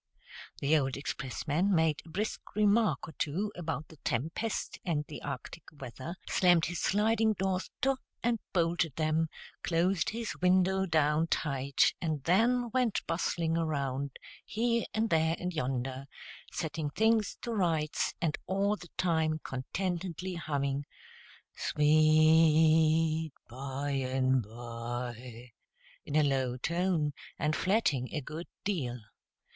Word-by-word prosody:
The 145 +3 +3
old 135 -1 -2
expressman 155 +7 -1
made 160 -2 +2
a 165 - -15
brisk 205 +6 -4
remark 215 0 +3
or - - -8
two 190 +8 -1
about 160 -3 -4
the 160 - -14
tempest 160 - -2
and 150 -4 -1
the 150 - -8
arctic 140 +3 -6
weather, 140 +3 -7
slammed 175 -3 +4
his 175 +1 -3
sliding 220 +2 +3
doors 190 -2 -1
to, 270 0 +2 0.3
and 235 -1 +1
bolted 170 -4 +1
them, 160 +1 +1 0.3
closed 175 +2 +1
his 230 0 -4
window 185 +1 +3
down 155 0 +2
tight, 140 -4 +1
and 155 -5 -2
then 235 - +3
went 250 -4 +1
bustling 165 -1 0
around, 140 -4 -1 0.3
here 235 +1 0
and 220 0 0
there 160 0 +3
and 180 0 -3
yonder, 130 -2 -2 0.4
setting 155 -2 -3
things 220 +4 +2
to 235 - -3
rights, 165 -7 0
and 160 -3 -1
all 200 +2 +1
the 175 -4 -12
time 160 -3 +1
contentedly 180 +6 -3
humming 140 -4 -1 0.7
"Sweet 155 +1 +4
By 135 +3 -4
and 130 -1 +1
By," 120 +1 -6 0.6
in 145 - -3
a 155 - +5
low 130 -3 +1
tone, 170 +1 0 0.2
and 150 +1 0
flatting 185 - +1
a 155 - -1
good 155 +5 -7 0.2
deal. 135 -12 -2
160 Hz, 125 wpm, -31 LUFS, 140-185 Hz, 0.7 s, a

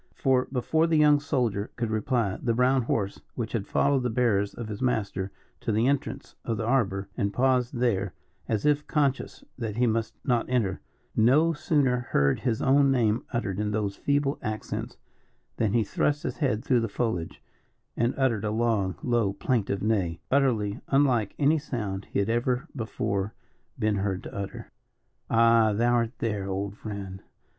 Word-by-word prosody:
For, 130 -2 +2
before 160 +5 +1
the 165 -1 +2
young 150 -1 +6
soldier 120 -8 -1
could 115 -2 -2
reply, 110 -2 0
the 115 -2 0
brown 130 +2 +3
horse, 105 -4 -2
which 115 -2 -3
had 105 -4 -2
followed 140 -1 +2
the 125 - 0
bearers 110 -4 +1
of 115 - -6
his 105 -1 -6
master 100 -6 -1 0.3
to - - -2
the 110 +2 +2
entrance 140 +1 -1
of 115 - -2
the 110 - -2
arbour, 100 -6 +1
and 100 0 0
paused 125 +1 +1
there, 120 -6 0 0.3
as 110 -2 0
if 150 0 +2
conscious 140 -4 0 0.2
that 110 -4 -3
he 125 - +3
must 115 -1 -1
not 120 -3 +1
enter, 115 -7 0 0.3
no 145 +9 +4
sooner 140 -5 +1
heard 70 - +1
his 115 -4 -1
own 140 +1 +5
name 120 -2 +2
uttered 100 -6 -2
in 105 0 0
those 105 -2 -1
feeble 145 0 0
accents, 110 -2 -4 0.6
than 110 -3 +1
he 115 - +3
thrust 145 - 0
his - - -3
head 125 -7 0
through 125 -3 +3
the 115 - -2
foliage 100 -7 -2 0.6
and 120 +1 +1
uttered 120 -6 +1
a 105 - 0
long, 110 -4 0
low, 115 -5 +1
plaintive 100 -4 -1
neigh, 95 -7 0
utterly 120 -7 +1
unlike 130 -7 +2
any 150 +2 +3
sound 105 -9 -4
he - - -4
had 100 - +1
ever 125 +5 0
before 105 -4 -2 0.4
been 105 -1 +1
heard 95 -1 -2
to - - -9
utter. 100 0 -6 0.6
"Ah! 115 -1 +5
thou 120 +3 +2
art 115 0 0
there, 105 -4 -2
old 100 +1 -3
friend. 100 -3 -7
115 Hz, 170 wpm, -27 LUFS, 105-130 Hz, 0.6 s, young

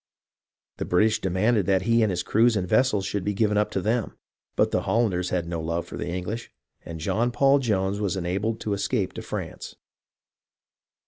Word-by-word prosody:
The - - -3
British 110 +4 +2
demanded 95 +2 +1
that 95 -1 +2
he 115 +2 +3
and 110 - +3
his 90 -2 -1
crews 115 +3 +3
and 90 -2 -2
vessels 105 -3 +2
should 100 -1 -2
be 105 +1 -1
given 105 0 +2
up 105 0 +2
to 95 - -2
them; 115 +2 -1 0.4
but - - +2
the - - +1
Hollanders 95 -6 0
had 85 -2 -1
no 85 -1 -3
love 85 +1 -2
for - - -9
the - - -4
English, 90 +6 -4 0.3
and 80 -1 -7
John 115 +9 0
Paul 140 +3 +4
Jones 100 -5 0
was 95 -2 -1
enabled 95 +5 -2
to 105 - -1
escape 100 0 -1
to - - -6
France. - - -6
100 Hz, 190 wpm, -25 LUFS, 90-110 Hz, 0.4 s, Paul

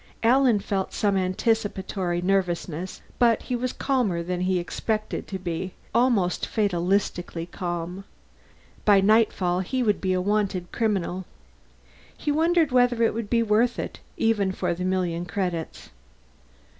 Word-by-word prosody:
Alan 250 -1 +5
felt 195 -1 -2
some 205 -2 +1
anticipatory 190 -2 -1
nervousness, 180 -2 -1 0.2
but 235 -2 +4
he 250 - -2
was 250 +1 -1
calmer 235 -11 0
than 180 +1 -3
he 185 0 +1
expected 215 +5 -3
to 195 - -4
be 180 0 -4 0.2
almost 230 -7 +2
fatalistically 180 -3 0
calm. 175 +1 -4 0.8
By 205 -2 +6
nightfall, 195 -3 +3
he 250 +8 -1
would 210 -4 +1
be 185 -1 +1
a 185 - +1
wanted 195 -2 -1
criminal. 190 -5 -1 0.9
He 295 - -1
wondered 325 0 +3
whether 245 -2 +3
it 230 - +3
would 225 -2 -4
be 230 -1 +3
worth 225 +3 +2
it, - - -5 0.2
even 210 -4 +2
for 180 -2 -1
the 180 +2 -4
million 180 -2 -1
credits. 180 -4 -3
195 Hz, 135 wpm, -25 LUFS, 180-225 Hz, 0.9 s, By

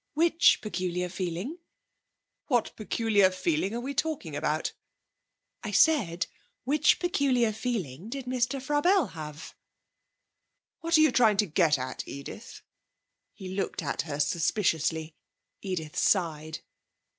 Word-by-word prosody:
'Which 330 +1 +4
peculiar 180 -3 -2
feeling?' 185 - -4 0.9
'What 245 -5 +1
peculiar 215 -2 +2
feeling 185 +2 -1
are - - -2
we 265 +3 -4
talking 275 - -2
about?' 155 +1 -1 0.9
'I 215 - -5
said, 195 - +3 0.4
which 300 +3 +3
peculiar 265 -10 +1
feeling 205 - -4
did 270 +1 -5
Mr. 250 +1 -1
Frabelle 295 - +2
have?' 155 -1 -8 1.3
'What 335 0 +2
are - - +5
you 310 - +5
trying 220 -4 +4
to 210 - +3
get 160 -3 +3
at, 130 0 -5
Edith?' 140 +11 -9 0.7
He 190 -3 -9
looked 190 +1 -3
at - - -1
her 150 -3 -5
suspiciously. 160 0 0 0.5
Edith 175 -6 -4
sighed. 160 -4 0
200 Hz, 120 wpm, -28 LUFS, 165-255 Hz, 1.3 s, are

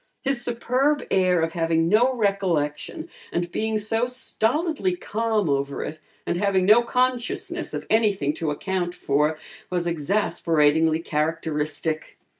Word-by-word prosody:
His 270 -2 0
superb 255 +5 +1
air 185 -2 +3
of 165 0 -1
having 165 -1 +1
no 225 +8 +4
recollection 195 - -1 0.2
and 175 0 -2
being 220 +2 -1
so 225 +3 0
stolidly 300 - 0
calm 220 - -1
over 140 -1 -1
it, 155 +1 -6 0.3
and 175 - -1
having 190 -1 +2
no 215 +4 +7
consciousness 250 0 -1
of - - -5
anything 205 -10 +2
to 160 -1 -2
account 180 +3 -2
for, 150 0 +1 0.3
was 180 -1 -1
exasperatingly 160 -2 +2
characteristic. 155 0 -2
185 Hz, 125 wpm, -24 LUFS, 160-230 Hz, 0.3 s, no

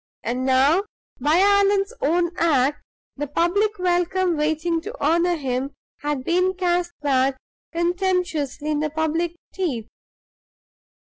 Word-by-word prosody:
And 255 +2 -2
now, 270 +7 +4 0.4
by 300 +3 +3
Allan's 400 +2 +3
own 345 +3 +1
act, 295 -5 +2 0.4
the 290 +1 -3
public 400 +8 +1
welcome 360 0 +1
waiting 315 +2 0
to - - -7
honor 340 +4 +2
him 270 -2 -3 0.2
had 290 -2 -2
been 365 +5 +1
cast 350 -1 0
back 270 -2 +2 0.3
contemptuously 345 -5 -1
in 300 - 0
the 305 0 -1
public 320 +2 -1 0.2
teeth! 275 - -2
330 Hz, 120 wpm, -23 LUFS, 290-360 Hz, 0.4 s, now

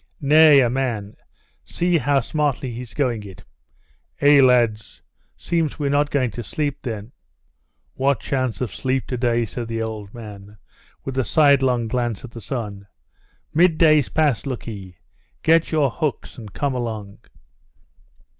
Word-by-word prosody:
"Nay, 150 0 +6
a 125 - +3
man! 115 -5 -3 0.5
See 175 -1 0
how 140 -1 +2
smartly 145 -1 -1
he's 120 0 -8
going 125 -6 0
it!" 100 -1 -12 0.8
"Eh, 145 0 +6
lads! 120 -4 +2 0.3
seems 165 -4 -1
we're 145 -2 -1
not 145 +1 +2
going 130 -5 0
to 120 - -6
sleep, 145 +5 -3
then?" 110 -2 -6 0.8
"What 135 -2 +1
chance 130 -4 -2
of 115 -7 -3
sleep 130 0 -1
today!" 120 -2 0
said 115 +2 -6
the 115 0 -3
old 110 -3 -6
man, 105 -3 -11 0.5
with 135 0 -3
a - - +2
sidelong 135 -5 +3
look 120 0 -2
at 120 - -12
the 115 - -9
sun. 105 -6 -5 0.7
"Midday's 155 -4 +4
past, 145 -4 +1
look 130 -3 -5
ee! 95 -6 -8 0.5
Get 165 +1 +3
your 150 -5 +2
hooks, 155 0 -3
and 110 -3 -10
come 140 -2 -2
along!" 110 -5 -5
125 Hz, 145 wpm, -22 LUFS, 115-145 Hz, 0.8 s, Nay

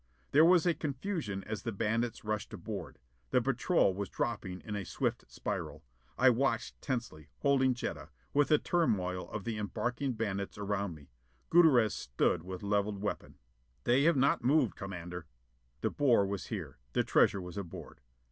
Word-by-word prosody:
There 150 +3 +7
was 175 0 +6
a 175 - +4
confusion 140 - -3
as 110 - -4
the 115 - -3
bandits 115 +3 -1
rushed 110 0 -2
aboard. - - -6 0.3
The - - +4
patrol 135 - +2
was 100 0 -4
dropping 95 -6 -3
in 105 - -5
a 100 - -2
swift - - -2
spiral. - - -4 0.3
I 130 0 +6
watched 135 +3 -1
tensely, 115 - -4
holding 130 -2 +3
Jetta, 80 -9 -5 0.2
with 145 0 +4
the 150 - +5
turmoil 95 - 0
of 105 - -5
the 110 0 -3
embarking 125 +5 -2
bandits 100 -4 -3
around 100 -3 -2
me. 70 -4 -16 0.4
Gutierrez 140 -11 +6
stood 65 +5 0
with 90 +2 -7
levelled 100 0 0
weapon. 105 - -4 0.5
"They 130 +4 +3
have 170 -3 +4
not 135 -1 +3
moved, 135 -2 +3
Commander." 90 -4 -6 0.5
De - - 0
Boer 125 -8 +4
was 100 -1 -4
here. - - -6
The - - +2
treasure 100 - +3
was 90 0 -7
aboard. 95 -5 -8
110 Hz, 160 wpm, -32 LUFS, 95-135 Hz, 0.5 s, There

